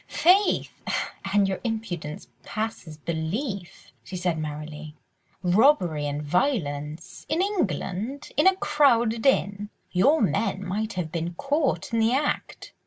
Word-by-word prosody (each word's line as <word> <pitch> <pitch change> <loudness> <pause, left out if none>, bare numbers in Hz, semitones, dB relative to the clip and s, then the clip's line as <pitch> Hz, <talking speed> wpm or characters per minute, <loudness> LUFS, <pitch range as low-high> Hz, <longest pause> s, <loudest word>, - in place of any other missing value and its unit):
"Faith! 380 +4 +3 0.6
and 200 -1 +4
your 190 -1 -2
impudence 215 -10 -4
passes 215 -8 -5
belief," 175 - -4
she 190 - -8
said 175 -2 0
merrily. 150 0 -6 0.5
"Robbery 180 - +3
and 145 +1 -3
violence!—in 160 - -1
England!—in 285 - 0
a 380 - +6
crowded 240 -8 +3
inn! 205 -5 +1 0.2
Your 275 - +4
men 200 -1 0
might 215 +4 -2
have 175 -4 -3
been 170 +1 -3
caught 280 - 0
in 230 - +2
the 225 +2 +3
act!" 285 +3 -2
200 Hz, 115 wpm, -26 LUFS, 165-265 Hz, 0.6 s, a